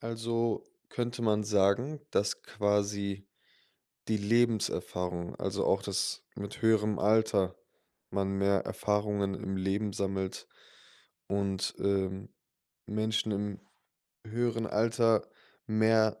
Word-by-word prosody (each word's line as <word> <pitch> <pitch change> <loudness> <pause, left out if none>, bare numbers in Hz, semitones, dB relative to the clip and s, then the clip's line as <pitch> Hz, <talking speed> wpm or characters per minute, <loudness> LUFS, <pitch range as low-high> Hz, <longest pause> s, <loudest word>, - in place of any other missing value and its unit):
Also, 115 - -1 0.2
könnte 120 0 -3
man 105 -1 +2
sagen, 105 +8 +2
dass 100 - 0
quasi 100 -1 -1 0.8
die 110 - +2
Lebenserfahrung, 100 -5 0
also - - -1
auch, - - +2
dass - - -1
mit 100 +2 -7
höherem 110 -2 +3
Alter, 105 -3 +3 0.6
man 95 0 0
mehr 100 0 +2
Erfahrungen 105 -1 0
im 95 0 -4
Leben 100 +2 0
sammelt 95 -1 -3 0.8
und, 100 -1 -1
ähm, 95 -1 -1 0.6
Menschen 110 +1 0
im 100 0 -2 0.7
höheren 115 0 0
Alter 115 0 +2 0.4
mehr 110 0 +3
105 Hz, 100 wpm, -31 LUFS, 100-110 Hz, 0.8 s, höherem